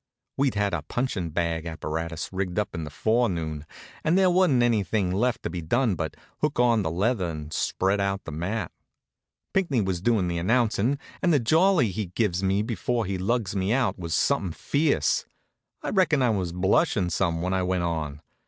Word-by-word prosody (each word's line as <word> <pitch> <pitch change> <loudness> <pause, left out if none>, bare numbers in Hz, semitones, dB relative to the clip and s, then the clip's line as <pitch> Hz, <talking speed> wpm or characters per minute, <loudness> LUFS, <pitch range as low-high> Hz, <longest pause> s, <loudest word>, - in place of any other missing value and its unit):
We'd 135 -4 +1
had 100 -2 0
the 85 - -1
punchin' 95 - -2
bag 85 0 -1
apparatus 80 0 -4
rigged 95 -2 -2
up 105 -2 -1
in 85 -3 -4
the - - -6
forenoon, 85 -7 0 0.4
and 165 +4 +3
there 190 -1 +4
wasn't 175 -9 +4
anything 105 -4 +1
left 115 +5 0
to - - -2
be 90 -1 -4
done 115 +7 +1
but 80 -2 -4 0.2
hook - - -1
on 120 -3 +4
the 80 - -1
leather 95 +2 0
and 75 -1 -6
spread 95 +5 0
out 100 0 -1
the - - -7
mat. 90 +9 -3 0.8
Pinckney 170 -10 +1
was 95 -3 -2
doin' 105 -4 +2
the 85 -1 -1
announcin' 115 +5 +2 0.2
and 175 - +3
the 150 - +4
jolly 160 - +3
he 105 +1 -3
gives 90 -1 0
me 100 +2 +1
before 115 +1 -1
he 95 0 -3
lugs 105 0 -1
me 95 +1 0
out 125 -6 +1
was 85 -2 -2
somethin' 90 -4 +1
fierce. 140 - +1 0.6
I - - -2
reckon 170 -8 +3
I 120 - +3
was 95 -5 -1
blushin' 90 0 +2
some 85 -3 0
when 90 +1 0
I 95 - +1
went 90 -1 0
on. 80 -4 -3
95 Hz, 190 wpm, -26 LUFS, 85-120 Hz, 0.8 s, there